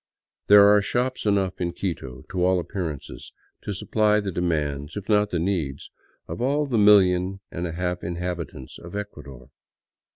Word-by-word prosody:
There 100 0 +8
are 105 0 +6
shops 125 +3 -1
enough 95 -3 0
in 85 -1 -1
Quito, 65 -9 -5
to 90 -2 -1
all 90 0 +3
appearances, 85 -6 -6 0.3
to - - -5
supply 105 +2 +1
the 100 -2 -3
demands, 75 -3 -2
if 100 - -6
not 105 -1 +3
the 90 - -2
needs, 80 -6 -2 0.4
of 85 - -6
all 145 +4 +1
the 125 -5 0
million 95 -2 +4
and 85 +1 -3
a 85 - -6
half 90 +1 -3
inhabitants 85 -5 -5
of 85 +3 -10
Ecuador. 75 -11 -8
90 Hz, 160 wpm, -24 LUFS, 85-105 Hz, 0.4 s, There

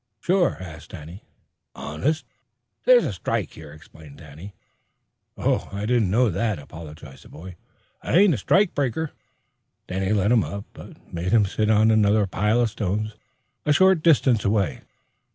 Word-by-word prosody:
"Sure?" 180 -1 +1
asked 85 -4 -10
Danny. 85 +1 -10 0.5
"Honest." 145 - -2 0.6
"This 250 -1 +6
here's - - -2
a - - -2
strike," 90 - -3
explained 75 -1 -14
Danny. 85 +6 -12 0.8
"Oh, - - -1
I 100 +1 -4
didn't 115 -4 +1
know 115 +3 +2
that," 105 +2 -1
apologized 75 -2 -11
the - - -16
boy. 90 +3 -11 0.5
"I - - +1
ain't 195 -2 +5
a - - -1
strike 190 - +2
breaker." 145 +3 -2 0.8
Danny 95 +1 -2
let 105 0 +2
him 120 -3 +4
up, 100 0 -6
but - - -14
made 85 +2 -3
him 110 -3 +4
sit 105 +2 -1
on 110 +1 +4
another 105 -1 +3
pile 105 +5 +1
of 115 -3 0
stones 105 +2 -3 0.5
a 150 - +1
short 190 +2 +4
distance 135 - +3
away. 100 - 0
105 Hz, 155 wpm, -23 LUFS, 90-125 Hz, 0.8 s, This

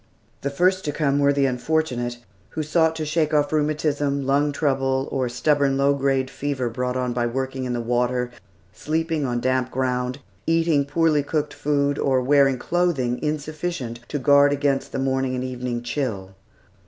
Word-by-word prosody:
The 140 - -1
first 185 +6 +2
to 150 - 0
come 145 -2 +1
were 140 0 +4
the 140 -1 +2
unfortunate, 125 -2 -1 0.3
who 155 - -3
sought 160 +1 +2
to 160 -1 -3
shake 155 0 0
off 145 +1 +2
rheumatism, 145 -2 0
lung 145 +2 +2
trouble, 135 -2 0
or 130 -2 0
the - - -4
stubborn 145 -3 +2
low 140 +1 +3
grade 135 -1 +1
fever 130 -3 -3
brought 125 +2 -2
on 125 -1 -1
by 120 0 0
working 130 +1 -3
in 125 - -2
the 120 - -2
water, 125 +1 0 0.4
sleeping 160 -1 -1
on 120 -1 -1
damp 130 0 0
ground, 125 -1 -1 0.3
eating 165 -3 +2
poorly 155 0 +2
cooked 150 0 -2
food, 145 -1 0
or 130 -2 +2
wearing 135 0 +3
clothing 140 -6 0
insufficient 150 -4 -3
to 150 - -3
guard 140 +1 +5
against 140 -1 0
the - - -3
morning 130 -1 0
and 125 - -2
evening 125 -2 -4
chill. 115 -7 -3
140 Hz, 170 wpm, -23 LUFS, 125-150 Hz, 0.4 s, guard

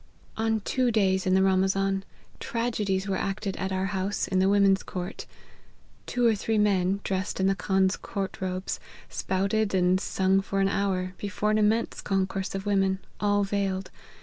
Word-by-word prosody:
" - - -30
On 220 -1 +1
two 255 +4 +1
days 190 -4 +2
in 185 - +4
the 190 - +4
Ramazan, 195 0 +2 0.4
t^$edies 210 -5 -1
were 195 - 0
acted 195 0 -2
at 190 +1 -3
our 190 0 0
house, 195 +2 -1
in 190 - +1
the 190 +1 +4
women's 200 -1 +4
ccrirt. 180 0 -6 0.8
Two 245 -1 0
or 230 - +5
three 220 +1 -1
men, 200 -2 +2
dressed 190 +1 -2
in 190 - +2
the 195 - +4
Khan's 190 0 +1
co'\rt 195 -1 -5
robes, 185 0 -3 0.3
spouted 200 +3 0
^nd 185 -1 +2
sung 190 0 +1
for 195 0 -2
an 195 0 +3
hour, 185 -2 -1
before 210 +1 -1
an 215 - +2
immense 215 +2 +1
concourse 195 0 -1
of 195 +1 -4
women, 195 -2 +2 0.2
all 205 0 +2
veiled. 195 -1 -2
195 Hz, 175 wpm, -27 LUFS, 190-205 Hz, 0.8 s, or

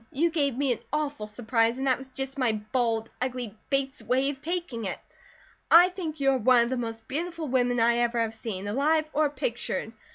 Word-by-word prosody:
You 330 +5 +1
gave 280 -6 0
me 275 -1 +1
an 240 - -1
awful 290 -7 -2
surprise, 230 +2 +1
and 265 - -2
that 260 -1 +2
was 265 0 -10
just 270 +1 -5
my 245 -4 +3 0.2
bald, 230 -3 0
ugly 250 -4 -3
Bates 275 -1 -1
way 265 +3 +1
of 270 -1 -11
taking 335 - -3
it. 185 - -3 0.7
I 350 +2 +8
think 335 -5 -5
you 275 -1 +3
are 265 - +1
one 245 +1 +5
of 235 - -2
the - - +1
most 225 -2 -5
beautiful 330 +2 -3
women 245 -2 +1
I 235 +1 +4
ever 240 0 +1
have 225 -1 0
seen, 205 -3 -5
alive 300 +8 +2
or 305 0 +3
pictured. 240 -4 -3
260 Hz, 205 wpm, -27 LUFS, 230-285 Hz, 0.7 s, I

